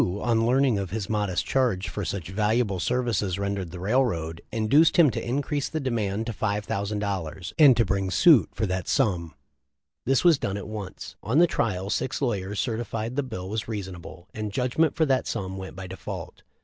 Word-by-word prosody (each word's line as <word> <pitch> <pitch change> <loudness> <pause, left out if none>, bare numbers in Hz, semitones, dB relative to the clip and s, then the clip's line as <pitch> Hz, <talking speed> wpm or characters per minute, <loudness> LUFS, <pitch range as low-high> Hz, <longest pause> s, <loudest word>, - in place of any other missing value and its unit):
on 115 -1 +1
learning 130 -3 +3
of 95 -2 -3
his 105 +1 -3
modest 105 -4 0
charge 120 -8 +1
for 105 - -4
such 85 0 -4
valuable 105 0 +1
services 110 -3 0
rendered 100 -2 -2
the 90 +1 -8
railroad, 90 -7 0
induced 115 +9 +4
him 160 -6 +6
to - - -4
increase 140 +3 -1
the 160 - -2
demand 110 -6 -1
to 115 - -3
$5,000, 100 -4 -3
and 140 -6 +8
to 115 - +4
bring 95 -1 -1
suit 155 - +5
for 110 - -2
that 95 -2 -2
sum. 90 - 0 0.7
This 135 -1 +3
was 170 -5 +5
done 100 0 -2
at 100 - -6
once. 105 -3 -7
On 120 +7 0
the 175 - +7
trial 100 - -1
six 130 - -1
lawyers 105 -6 -2
certified 115 -1 -2
that 130 - -9
the 130 - -7
bill 95 -5 -5
was 105 +2 -3
reasonable, 95 -4 -7
and 105 -1 -4
judgment 130 +7 +1
for 160 - +3
that 135 -3 +1
sum 95 -1 -3
went 95 -1 -7
by 95 0 -7
default. 95 +1 -7
105 Hz, 190 wpm, -26 LUFS, 95-125 Hz, 0.7 s, and